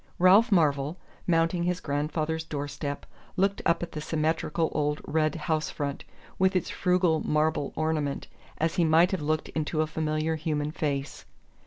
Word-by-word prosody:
Ralph 200 +6 +6
Marvell, 150 -3 +2 0.3
mounting 165 0 +2
his 180 +1 0
grandfather's 155 +2 -2
doorstep, 145 -1 -4 0.3
looked 195 +1 +1
up 170 - +2
at 175 - -5
the 150 - -5
symmetrical 160 +1 0
old 150 0 0
red 155 -1 +1
house 155 -1 -1
front, 140 -2 -4 0.3
with 190 0 +3
its 185 - 0
frugal 180 -3 +2
marble 150 -1 0
ornament, 155 -3 -1 0.3
as 160 +1 0
he 175 - +4
might 165 +2 +5
have 190 -5 -1
looked 155 +1 -1
into 155 0 -2
a - - +2
familiar 155 +1 -1
human 150 -1 -2
face. 140 -3 -3
155 Hz, 155 wpm, -27 LUFS, 150-170 Hz, 0.3 s, Ralph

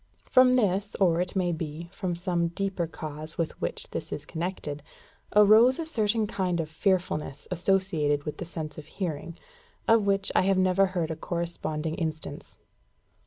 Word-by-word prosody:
From 255 0 +6
this, 205 -3 +1
or, 175 -3 +3
it 180 +2 -3
may 180 -2 +1
be, 160 0 -5
from 185 -4 -2
some 175 -1 0
deeper 185 0 -2
cause 155 0 -7
with 165 -2 0
which - - -1
this - - -5
is - - -5
connected, 160 -4 -4 0.5
arose 215 +5 +7
a 330 - -3
certain 220 -7 +1
kind 185 -4 -1
of 160 -1 -3
fearfulness 160 -6 -1
associated 175 -5 +1
with 150 - -5
the - - -4
sense 155 -3 -6
of 150 - -11
hearing, 165 -2 -4 0.5
of 225 -2 +4
which 195 0 +1
I - - +4
have 190 0 +2
never 185 +1 +4
heard 175 -4 -2
a - - -2
corresponding 160 -2 -3
instance. 160 -2 -5
175 Hz, 165 wpm, -27 LUFS, 160-195 Hz, 0.5 s, arose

